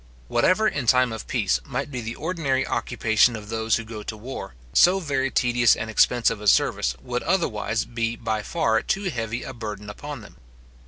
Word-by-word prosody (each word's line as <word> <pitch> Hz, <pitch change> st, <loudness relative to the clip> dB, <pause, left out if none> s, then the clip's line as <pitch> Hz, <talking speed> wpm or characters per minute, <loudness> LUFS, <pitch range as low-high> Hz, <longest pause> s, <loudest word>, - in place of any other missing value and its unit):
Whatever, 215 Hz, +4 st, +3 dB
in 145 Hz, -, -2 dB
time 125 Hz, 0 st, +4 dB
of 110 Hz, -, -6 dB
peace, 60 Hz, -, +1 dB
might 145 Hz, -, -4 dB
be 125 Hz, -3 st, -4 dB
the 115 Hz, +1 st, -5 dB
ordinary 150 Hz, -5 st, -1 dB
occupation 115 Hz, 0 st, +2 dB
of 105 Hz, -1 st, -9 dB
those 110 Hz, 0 st, +1 dB
who 115 Hz, -, -3 dB
go 110 Hz, -1 st, -8 dB
to 110 Hz, +1 st, -6 dB
war, 115 Hz, -, -7 dB, 0.2 s
so 185 Hz, +2 st, +5 dB
very 135 Hz, -6 st, -1 dB
tedious 120 Hz, -2 st, +3 dB
and 110 Hz, -, -5 dB
expensive 115 Hz, -1 st, +3 dB
a 105 Hz, -, -4 dB
service -, -, +3 dB
would 125 Hz, 0 st, -2 dB
otherwise 115 Hz, -, 0 dB
be 115 Hz, -1 st, -2 dB
by 110 Hz, -2 st, -2 dB
far 110 Hz, -2 st, +1 dB
too 195 Hz, -2 st, -1 dB
heavy 115 Hz, -2 st, -3 dB
a -, -, -7 dB
burden 105 Hz, -3 st, -6 dB
upon -, -, -8 dB
them. -, -, -15 dB
115 Hz, 190 wpm, -24 LUFS, 110-135 Hz, 0.2 s, so